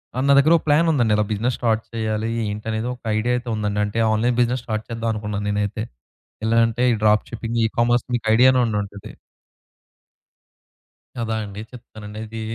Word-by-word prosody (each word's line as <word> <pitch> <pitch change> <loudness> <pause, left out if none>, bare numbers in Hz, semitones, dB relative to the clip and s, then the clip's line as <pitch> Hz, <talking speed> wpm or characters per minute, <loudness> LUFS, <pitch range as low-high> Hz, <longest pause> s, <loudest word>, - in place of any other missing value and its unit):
ఆ - - -2
నా 140 - +6
దగ్గర 155 +4 +5
ఒక - - -7
ప్లాన్ 155 +3 +4
ఉందండి. 120 -7 +2
ఇలా 105 - +1
బిజినెస్ 115 +4 0
స్టార్ట్ 115 -2 +1
చెయ్యాలి 110 0 -2 0.2
ఏంటి 105 +2 -6
అనేది, 110 +2 -2
ఒక 125 - -23 0.2
ఐడియా 120 +3 0
అయితే 125 0 -6
ఉందండి. 105 -1 -2
అంటే, 105 +2 -3
ఆన్‌లైన్ 120 +3 +1
బిజినెస్ 120 0 0
స్టార్ట్ 110 -1 -3
చేద్దాం 115 0 -3
అనుకున్నాను 105 -1 -4
నేనైతే. 105 +1 -1 0.6
ఎలాగంటే 115 +1 +2
ఈ - - +1
డ్రాప్ 105 0 +4
షిప్పింగ్ 115 0 -3
ఈ - - +3
కామర్స్ 120 +1 +2
మీకు 120 - -4
ఐడియానే 130 +2 +5
ఉండుంటది. 105 -2 -4 2.0
కదా 115 -2 -2
అండి 100 0 -8
చెప్తానండి. 110 -4 -10
ఇది 110 +1 -7
115 Hz, 170 wpm, -22 LUFS, 105-120 Hz, 2.0 s, నా